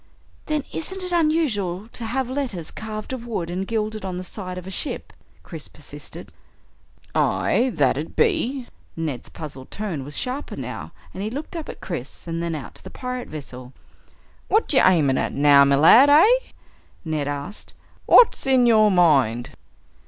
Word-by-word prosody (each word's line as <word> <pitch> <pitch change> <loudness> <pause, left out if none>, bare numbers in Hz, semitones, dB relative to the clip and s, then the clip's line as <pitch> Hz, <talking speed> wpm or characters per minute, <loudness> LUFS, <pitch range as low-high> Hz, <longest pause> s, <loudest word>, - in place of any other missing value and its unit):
"Then 305 -2 0
isn't 380 +3 -4
it 360 - -5
unusual 265 - 0
to 235 - -6
have 255 +3 -1
letters 250 - -3
carved 215 +2 -6
of 240 -2 -6
wood 175 -7 -3
and 190 +2 -3
gilded, 215 -1 -2
on 185 -2 -4
the 180 - -5
side 185 -1 -7
of 180 - -7
a 190 - -7
ship?" 240 - -3 0.3
Chris - - -8
persisted. - - -10 0.8
"Aye, 255 +2 +2
that - - +2
it - - -7
be." 280 - +1 0.3
Ned's 155 -6 -4
puzzled 135 -4 -9
tone 190 -10 -4
was 145 +2 -5
sharper 260 +3 -3
now - - -6 0.2
and 190 - -6
he 210 - -2
looked 290 +8 -6
up 325 -2 -5
at - - -9
Chris 165 -8 -6
and 165 0 -3
then 170 -1 -2
out 145 - -7
to - - -15
the - - -9
pirate 250 -1 -5
vessel. 130 -4 -9 0.7
"What're 425 -8 +1
ye - - +7
aimin' 150 -8 +4
at - - -2
now, 140 0 +6
me 140 0 +4
lad, 225 - +7
eh?" 430 +13 +5 0.6
Ned 155 -3 -2
asked. 145 +8 -6 0.3
"What's 475 - +6
in 260 -2 +5
your 215 -2 +5
mind?" 140 - +3
205 Hz, 170 wpm, -23 LUFS, 160-260 Hz, 0.8 s, ye